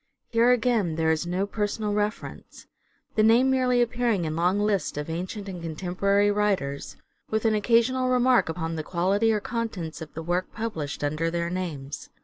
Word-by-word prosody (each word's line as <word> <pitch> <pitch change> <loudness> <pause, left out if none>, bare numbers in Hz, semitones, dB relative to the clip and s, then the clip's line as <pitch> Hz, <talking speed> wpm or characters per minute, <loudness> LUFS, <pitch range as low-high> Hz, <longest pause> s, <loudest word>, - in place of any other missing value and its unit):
Here, 230 +1 +3
again, 230 -8 +2
there 160 0 +2
is 160 +2 -1
no 180 +3 0
personal 210 0 -2
reference: 210 +1 -4 0.5
the 215 - +2
name 235 +4 +5
merely 250 -2 +3
appearing 235 -6 0
in 155 0 -2
long 180 +4 +2
lists 205 -7 0
of 150 +2 -4
ancient 185 +5 -5
and 180 -3 -6
contemporary 190 +5 +1
writers 195 -10 -1 0.3
with 220 +1 -1
an 220 - +4
occasional 235 +4 +2
remark 250 -5 +3
upon 165 0 -3
the 155 - -3
quality 195 +7 +1
or 215 - +1
contents 210 -9 -4
of 160 - -8
the 160 - -5
work 175 +2 -1
published 165 -12 -4
under 155 +3 0
their 170 0 -2
names. 155 -7 -5
200 Hz, 170 wpm, -26 LUFS, 165-225 Hz, 0.5 s, name